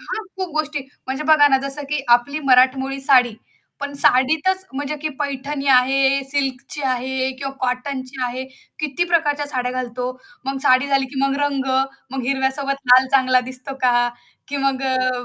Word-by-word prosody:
हां, 440 - -5
खूप 375 -1 -3
गोष्टी. 305 -1 -1 0.3
म्हणजे 265 +3 -3
बघा 305 -1 +6
ना 270 - +4
जसं 275 +2 -6
की 295 -1 -1
आपली 280 +5 -6
मराठमोळी 265 +2 +3
साडी 255 -4 +4 0.5
पण 285 0 -4
साडीतच 315 +9 +2
म्हणजे 285 +2 -3
की 310 - 0
पैठणी 280 0 -3
आहे, 270 +1 +4
सिल्कची 275 0 -3
आहे 260 0 -1
किंवा 275 -1 -4
कॉटनची 260 +1 -3
आहे, 250 +1 -4 0.3
किती 305 +3 -1
प्रकारच्या 300 -4 +1
साड्या 250 -3 -2
घालतो, 250 -1 -4 0.4
मग 270 0 -3
साडी 255 -1 +4
झाली 275 -1 +2
की 270 - -3
मग 275 0 +1
रंग, 280 -2 0 0.5
मग 265 0 -4
हिरव्यासोबत 275 +1 -1
लाल 255 +1 +7
चांगला 255 -1 +4
दिसतो 260 +1 -8
का? 240 -1 +3 0.4
की 285 - -3
मग 270 -1 0
अ, 255 -1 +1
270 Hz, 160 wpm, -20 LUFS, 255-285 Hz, 0.5 s, लाल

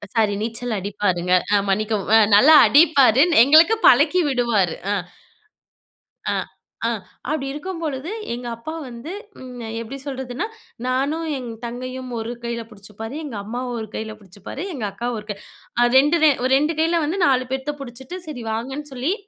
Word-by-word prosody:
Sorry, 215 -2 +3
நீச்சல் 230 +1 -3
அடிப்பாருங்க. 185 -2 -1 0.2
அ - - +6
மன்னிக்கவும். 210 +1 0 0.2
நல்லா 295 +10 +8
அடிப்பாரு, 280 -5 +5 0.2
எங்களுக்கு 315 - +6
பழக்கி 365 0 +5
விடுவாரு. 235 - +1 0.2
அ, - - +2 1.4
அ, - - 0 0.5
அ - - +1 0.4
அப்படி 300 -3 -1
இருக்கும்பொழுது, 315 -2 -5 0.2
எங்க 245 0 -7
அப்பா 310 +8 -7
வந்து 245 +8 -8 0.3
ம் 250 -1 -9 0.2
எப்படி 240 +4 -7
சொல்றதுன்னா, 265 - -4 0.4
நானும் 280 +6 -1
என் 250 -2 -6 0.2
தங்கையும் 255 +2 -6
ஒரு 225 +2 -4
கையில 235 -1 -3
புடிச்சுப்பாரு, 215 +4 -9
எங்க 250 -7 -6
அம்மாவ 245 +3 -4
ஒரு 220 - -6
கையில 220 0 -5
புடிச்சுப்பாரு, 200 - -8
எங்க 225 -6 -3
அக்கா 240 +1 -4
ஒரு 210 - -10
கை. 200 - -3 0.4
அ - - +6
2 295 +5 +4
வே 305 - +7
ஒரு 260 - +2
2 305 +3 0
கையில 330 0 +2
வந்து, 355 +6 -2
4 255 -2 +2
பேத்தை 265 +2 -2
புடிச்சுட்டு, 265 +7 -8
சரி 250 -6 -6
வாங்கன்னு 270 +6 -5
சொல்லி 260 +8 -1
255 Hz, 155 wpm, -22 LUFS, 225-290 Hz, 1.4 s, நல்லா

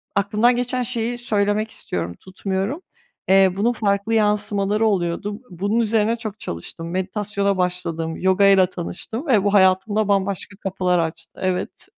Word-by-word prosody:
Aklımdan 210 +5 +3
geçen 250 +1 -1
şeyi 240 0 -2
söylemek 215 -2 0
istiyorum, 85 0 -4
tutmuyorum. 195 - -3 0.5
Eee, 190 -1 +5
bunun 230 +4 +2
farklı 200 -1 0
yansımaları 210 0 +2
oluyordu. 200 +2 -1
Bunun 200 +6 -1
üzerine 225 0 +2
çok 220 -3 -7
çalıştım. 165 - -6
Meditasyona 200 +1 -1
başladım, 170 -3 -2
yogayla 190 0 +4
tanıştım 220 - -6
ve 220 -8 +4
bu 200 0 +1
hayatımda 200 +2 +3
bambaşka 200 0 -1
kapılar 185 -3 0
açtı, 165 0 -4
evet. 185 -1 -2
200 Hz, 130 wpm, -21 LUFS, 185-215 Hz, 0.5 s, Eee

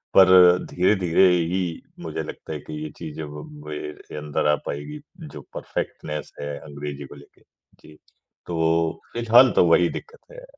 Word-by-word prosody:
पर 95 -1 +9 0.4
धीरे-धीरे 90 -1 +3
ही 90 +1 +1 0.4
मुझे - - -4
लगता - - -9
है 75 - -5
कि 75 - -5
ये 75 - -5
चीज़ 80 -3 -8
व 75 -1 -7
अब - - -10 0.2
मेरे 75 0 -7
अंदर 75 0 -1
आ 75 - +4
पाएगी, 150 - -5 0.2
जो 155 -3 -9
परफ़ेक्टनेस 75 0 -5
है 70 0 -4
अंग्रेज़ी 70 -1 -7
को - - -12
लेके। 70 0 -18 0.4
जी, 75 0 -16 0.5
तो 80 -1 0
फिलहाल 120 +2 +6
तो - - +5
वही 85 +1 +4
दिक्कत 470 +2 -8
है। - - -11
80 Hz, 160 wpm, -23 LUFS, 75-95 Hz, 0.5 s, पर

